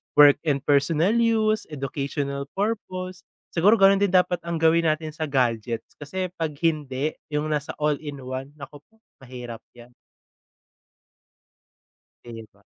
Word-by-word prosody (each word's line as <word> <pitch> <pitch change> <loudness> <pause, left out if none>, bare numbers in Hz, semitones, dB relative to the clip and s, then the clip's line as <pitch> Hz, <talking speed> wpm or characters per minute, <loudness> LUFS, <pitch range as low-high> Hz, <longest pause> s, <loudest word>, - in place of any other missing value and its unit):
work 145 -1 +8
and 140 -2 +1
personal 150 +6 +3
use, 220 -2 +2
educational 140 0 -4
purpose, 185 -3 -3 0.2
siguro 195 +6 +5
ganun 195 -2 +5
din 200 -1 +2
dapat 180 -1 +3
ang 170 - -1
gawin 165 +1 +3
natin 155 0 -1
sa 155 0 -4
gadgets 120 -4 -1
kasi 180 +5 -4
‘pag 155 -3 -2
hindi, 150 -2 0 0.2
yung 150 +1 -2
nasa 150 -1 -2
all-in-one, 140 -2 -3
nako 145 0 -11
po, 220 - -32 0.2
mahirap 125 -3 -8 0.2
‘yan. 120 0 -15 2.3
‘Di 115 -2 -9
ba. - - -27
150 Hz, 125 wpm, -24 LUFS, 135-175 Hz, 2.3 s, work